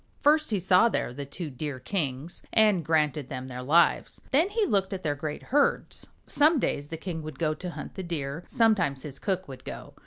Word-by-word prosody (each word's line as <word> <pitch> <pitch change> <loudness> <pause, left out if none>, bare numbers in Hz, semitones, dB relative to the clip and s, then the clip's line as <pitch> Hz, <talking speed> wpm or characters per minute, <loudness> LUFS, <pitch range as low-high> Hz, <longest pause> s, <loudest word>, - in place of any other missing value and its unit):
First 305 +1 +4
he 210 -3 +1
saw 185 +5 +5
there 120 - -2
the 140 +1 -6
two 155 +1 -6
Deer 135 0 -5
kings, 150 -2 -3
and 210 -6 +4
granted 150 -4 +1
them 130 -1 -5
their 125 0 -6
lives. 160 +7 +3
Then 315 +8 +4
he 430 0 +1
looked 195 - +1
at 185 - -5
their 150 - +1
great 150 +1 -5
herds. 285 +2 0 0.2
Some 305 +2 +4
days 145 - -1
the 160 - -5
king 165 -1 -5
would 155 0 -8
go 155 -2 +1
to 180 +3 -6
hunt - - -7
the 190 - -5
Deer, 160 -3 -4
sometimes 190 - +2
his 140 -3 -7
cook 190 -1 -2
would 130 -2 -10
go. - - -8
165 Hz, 210 wpm, -27 LUFS, 145-200 Hz, 0.2 s, saw